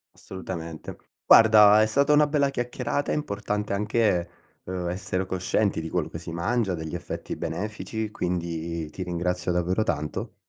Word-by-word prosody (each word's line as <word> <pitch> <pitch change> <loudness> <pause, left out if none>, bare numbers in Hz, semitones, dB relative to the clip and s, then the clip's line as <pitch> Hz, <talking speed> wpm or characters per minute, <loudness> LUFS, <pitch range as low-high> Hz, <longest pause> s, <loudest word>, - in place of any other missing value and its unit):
Assolutamente, 85 -4 -7 0.3
guarda, 110 -1 +8
è 110 - +4
stata 140 +6 +3
una 150 0 +5
bella 140 -2 +1
chiacchierata, 125 +2 -2
è - - +1
importante 105 -7 -2
anche, 105 -4 +1 0.4
uhm, 90 -1 -3
essere 95 +1 -2
coscienti 95 0 0
di 80 - -5
quello 90 -2 -1
che 80 - -7
si 80 0 -8
mangia, 95 +4 0
degli 80 -1 -6
effetti 85 - -5
benefici, 110 +4 -4
quindi 85 -3 -3
ti - - -8
ringrazio 90 0 -1
davvero 90 +3 0
tanto. 105 +1 -3
95 Hz, 150 wpm, -26 LUFS, 85-110 Hz, 0.4 s, guarda